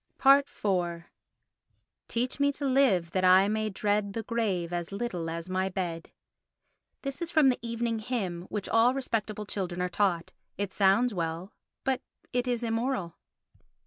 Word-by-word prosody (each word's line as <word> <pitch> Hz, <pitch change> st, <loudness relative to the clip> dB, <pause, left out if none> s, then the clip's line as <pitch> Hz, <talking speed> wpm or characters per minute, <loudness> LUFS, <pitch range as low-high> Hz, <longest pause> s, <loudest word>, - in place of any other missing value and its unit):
iv 195 Hz, -11 st, +3 dB, 1.0 s
Teach 250 Hz, +4 st, -1 dB
me 285 Hz, 0 st, +3 dB
to 285 Hz, -, -4 dB
live 255 Hz, -11 st, +3 dB
that 185 Hz, +1 st, 0 dB
I 185 Hz, +2 st, +6 dB
may 215 Hz, +1 st, 0 dB
dread 205 Hz, 0 st, 0 dB
The 225 Hz, -, -3 dB
grave 195 Hz, -7 st, -1 dB
as 175 Hz, 0 st, -3 dB
little 195 Hz, -6 st, -3 dB
as 165 Hz, +1 st, -5 dB
my 185 Hz, +1 st, 0 dB
bed. 175 Hz, -3 st, -4 dB, 0.9 s
This 275 Hz, +1 st, -4 dB
is 340 Hz, -, -2 dB
from 310 Hz, -5 st, +5 dB
the 250 Hz, -, 0 dB
evening 230 Hz, -1 st, -2 dB
hymn 195 Hz, -7 st, -3 dB
which 205 Hz, -2 st, -3 dB
all 235 Hz, +3 st, +4 dB
respectable 215 Hz, -5 st, -2 dB
children 185 Hz, -3 st, -3 dB
are 180 Hz, 0 st, 0 dB
taught. 180 Hz, -3 st, 0 dB, 0.3 s
It 200 Hz, -1 st, -3 dB
sounds 205 Hz, +5 st, +3 dB
well, 170 Hz, +2 st, -3 dB, 0.3 s
but 265 Hz, -1 st, 0 dB, 0.3 s
it 245 Hz, 0 st, 0 dB
is 245 Hz, -1 st, 0 dB
immoral. 225 Hz, -6 st, -1 dB
205 Hz, 150 wpm, -29 LUFS, 180-245 Hz, 1.0 s, I